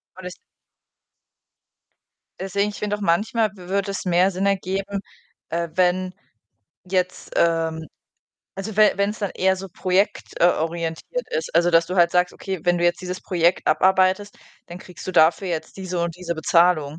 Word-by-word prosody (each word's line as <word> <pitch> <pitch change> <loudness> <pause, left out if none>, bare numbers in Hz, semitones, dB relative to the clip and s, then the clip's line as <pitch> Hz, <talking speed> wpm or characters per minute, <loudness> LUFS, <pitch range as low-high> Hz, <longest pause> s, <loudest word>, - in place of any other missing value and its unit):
War 185 - -11
das 180 0 -6 2.1
Deswegen, 200 +2 -1
ich 205 - -10
finde 210 0 -2
auch - - -13
manchmal 210 +4 +1
w 180 -2 -12
wird 200 +1 -1
es 195 - -4
mehr 180 +1 +3
Sinn 190 +1 -2
ergeben, 195 0 -1 0.5
äh, 170 0 -2
wenn 185 0 +1 0.7
jetzt, 185 0 -2
ähm 165 -1 +1 0.7
also 200 +2 -6
we 215 -1 +6
wenn's 200 +3 -1
dann 200 -2 -1
eher 190 +1 +3
so 190 +1 -8
projekt, 185 +2 -1
äh, 170 - +6
orientiert 165 - -2
ist, 160 +1 -3
also, 175 +1 +4
dass 165 0 +4
du 180 - -4
halt 175 -2 +4
sagst: 180 0 +1
„Okay, 190 -1 -5
wenn 175 0 +3
du 175 - -2
jetzt 175 - +2
dieses 180 0 -5
Projekt 175 0 +1
abarbeitest, 190 +2 +2 0.3
dann 175 +1 -9
kriegst 180 -2 -12
du 185 - -3
dafür 165 +3 +4
jetzt 160 -3 -4
diese 185 -2 -4
und 170 -1 -3
diese 175 -2 -4
Bezahlung“, 160 -2 +2
180 Hz, 170 wpm, -22 LUFS, 170-195 Hz, 2.1 s, we